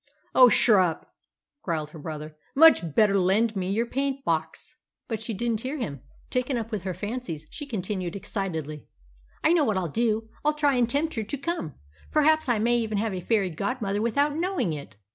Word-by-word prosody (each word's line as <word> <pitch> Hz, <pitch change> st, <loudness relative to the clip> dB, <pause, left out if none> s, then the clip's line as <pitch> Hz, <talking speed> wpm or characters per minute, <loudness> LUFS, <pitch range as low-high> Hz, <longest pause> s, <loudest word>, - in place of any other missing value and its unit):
"Oh, 255 Hz, -1 st, +8 dB
shurrup!" 190 Hz, -8 st, +3 dB, 0.6 s
growled 155 Hz, -4 st, -3 dB
her 160 Hz, -, -10 dB
brother. 155 Hz, 0 st, -7 dB, 0.2 s
"Much 270 Hz, -, +6 dB
better 200 Hz, -2 st, +4 dB
lend 210 Hz, +5 st, +2 dB
me 185 Hz, -1 st, -2 dB
your 220 Hz, +4 st, +1 dB
paint 270 Hz, +2 st, -2 dB
box." 160 Hz, -, -2 dB, 0.3 s
But 225 Hz, -3 st, -3 dB
she 225 Hz, -, -5 dB
didn't 225 Hz, +1 st, -1 dB
hear 265 Hz, +5 st, -3 dB
him; 145 Hz, -, -4 dB, 0.3 s
taken 250 Hz, 0 st, 0 dB
up 230 Hz, 0 st, -4 dB
with 210 Hz, -4 st, -2 dB
her 185 Hz, -, -2 dB
fancies 205 Hz, -8 st, -5 dB
she 290 Hz, -, -7 dB
continued 190 Hz, -6 st, -3 dB
excitedly 160 Hz, -7 st, -4 dB, 0.6 s
"I 320 Hz, -, +5 dB
know 335 Hz, -3 st, +4 dB
what 215 Hz, -7 st, +1 dB
I'll 180 Hz, -2 st, -1 dB
do. 220 Hz, +4 st, 0 dB, 0.2 s
I'll 300 Hz, +1 st, +3 dB
try 295 Hz, -2 st, +2 dB
and 245 Hz, -2 st, +2 dB
tempt 305 Hz, +5 st, 0 dB
her 225 Hz, -, -2 dB
to 285 Hz, -, -4 dB
come. 280 Hz, -, -4 dB, 0.3 s
Perhaps 310 Hz, -1 st, +3 dB
I 240 Hz, -, +3 dB
may 235 Hz, +3 st, +2 dB
even 220 Hz, -2 st, -2 dB
have 215 Hz, 0 st, -1 dB
a 185 Hz, -, -4 dB
fairy 195 Hz, -1 st, +1 dB
godmother 200 Hz, -, -2 dB
without 285 Hz, +6 st, +1 dB
knowing 345 Hz, -, -1 dB
it!" 140 Hz, -8 st, -8 dB
220 Hz, 190 wpm, -26 LUFS, 185-255 Hz, 0.6 s, Oh